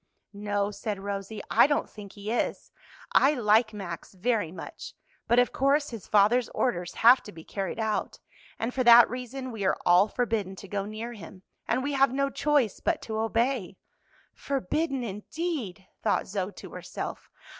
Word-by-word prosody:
"No," 205 0 -1
said 205 0 -4
Rosie, 200 +1 -5
"I 235 - +6
don't 290 - 0
think 205 -2 -11
he 205 +1 -6
is; 240 - -2 0.4
I 285 +3 +5
like 220 -1 +3
Max 190 -3 -7
very 210 -3 0
much, 185 - -9 0.3
but 240 - +3
of 245 0 +4
course 285 +2 +2
his 230 -4 -8
father's 215 +4 +4
orders 180 -7 -1
have 250 +2 +8
to 210 - -11
be 160 -3 -12
carried 195 +2 -4
out, 220 -1 -1 0.4
and 230 +2 -3
for 260 - 0
that 235 0 +9
reason 255 +1 -5
we 220 -3 -5
are - - +2
all 180 +3 +6
forbidden 220 -5 -2
to 195 - -11
go 200 +1 -3
near 220 +3 -6
him, 185 -2 -12 0.2
and 250 +3 0
we 285 +1 -2
have 275 -2 +4
no 275 +1 0
choice 290 -9 +1
but 335 -2 0
to 220 -1 -3
obey." 225 -3 0 0.6
"Forbidden, 275 - -2
indeed!" 215 - -4 0.2
thought - - +1
Zoe 190 0 -3
to - - -11
herself. - - -7
220 Hz, 170 wpm, -27 LUFS, 200-255 Hz, 0.6 s, that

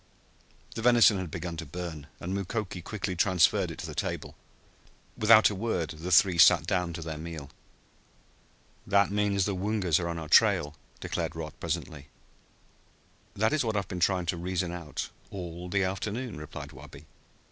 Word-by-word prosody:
The 115 - -5
venison 115 -4 +5
had 90 -3 -4
begun 85 +1 -5
to 80 - -4
burn, 80 -1 -6
and 90 +2 -4
Mukoki 100 -1 -3
quickly 95 0 -4
transferred 90 -1 +3
it - - -7
to - - -6
the - - -6
table. - - -4 0.8
Without 110 0 +6
a - - -3
word 95 -5 -2
the 80 +4 -6
three 90 0 +5
sat 90 - +7
down 90 -3 0
to 80 - -6
their 80 -1 -5
meal. 80 -4 -7 1.4
"That 100 0 +3
means 100 -2 +1
the 100 - -1
Woongas 95 -4 +1
are 85 -1 -2
on 85 - -3
our 80 -2 -6
trail," 75 0 +4 0.2
declared - - -3
Rod 80 -2 -6
presently. 75 -1 -4 1.3
"That 110 +7 +1
is 155 - +2
what 110 -2 -1
I - - +1
have 100 - -2
been 90 - -5
trying 90 0 +2
to 85 +1 -1
reason 90 0 -2
out 85 -4 -5 0.2
all 90 -2 -7
the 95 +1 +1
afternoon," 105 +5 -3
replied 75 -1 -8
Wabi. 70 - -13
90 Hz, 170 wpm, -28 LUFS, 85-100 Hz, 1.4 s, sat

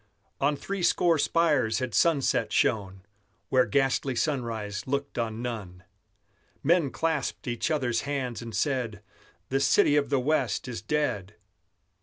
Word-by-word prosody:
On 145 +2 +2
threescore 175 -1 +1
spires 150 -9 +2
had 130 -4 -3
sunset 160 -6 +2
shone, 95 -3 0 0.5
Where 130 -1 +3
ghastly 135 -1 +1
sunrise 115 -8 -2
looked 140 -1 -2
on 115 0 -3
none. 100 -7 -6 0.8
Men 165 -1 +3
clasped 160 -2 -2
each 120 +5 -1
other's 125 -7 0
hands, 135 -5 -3
and 115 -2 -7
said: 115 -4 -1 0.5
"The 135 - +1
City 140 +2 +4
of 145 - +1
the 140 -1 +2
West 135 -2 0
is 120 -2 -5
dead!" 105 -10 -2
130 Hz, 130 wpm, -27 LUFS, 115-145 Hz, 0.8 s, City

